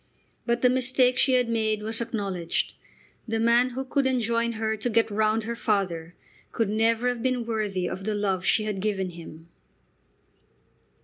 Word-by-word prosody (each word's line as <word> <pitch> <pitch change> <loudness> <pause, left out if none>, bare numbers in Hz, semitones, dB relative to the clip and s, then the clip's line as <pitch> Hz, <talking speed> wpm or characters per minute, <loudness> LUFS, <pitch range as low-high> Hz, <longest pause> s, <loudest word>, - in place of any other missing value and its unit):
But 235 +1 0
the 250 - +6
mistake 255 0 +2
she 265 - +4
had 250 -1 +3
made 220 -2 0
was 225 +2 -1
acknowledged. 200 -7 -2 0.5
The 225 0 -1
man 235 +2 +4
who 260 +2 -5
could 270 +1 +1
enjoin 235 -2 0
her 220 0 -1
to 220 +3 -2
"get 225 -1 +2
round" 215 +1 +1
her 235 +2 -4
father 180 -7 -1 0.4
could 225 -3 0
never 225 +3 +2
have 245 -2 -3
been 255 -1 0
worthy 210 -5 -2
of 185 - -5
the 215 +1 -1
love 195 -3 -1
she 215 - +2
had 210 -2 -3
given 190 -2 -1
him. 165 -1 -11
225 Hz, 170 wpm, -26 LUFS, 205-235 Hz, 0.5 s, the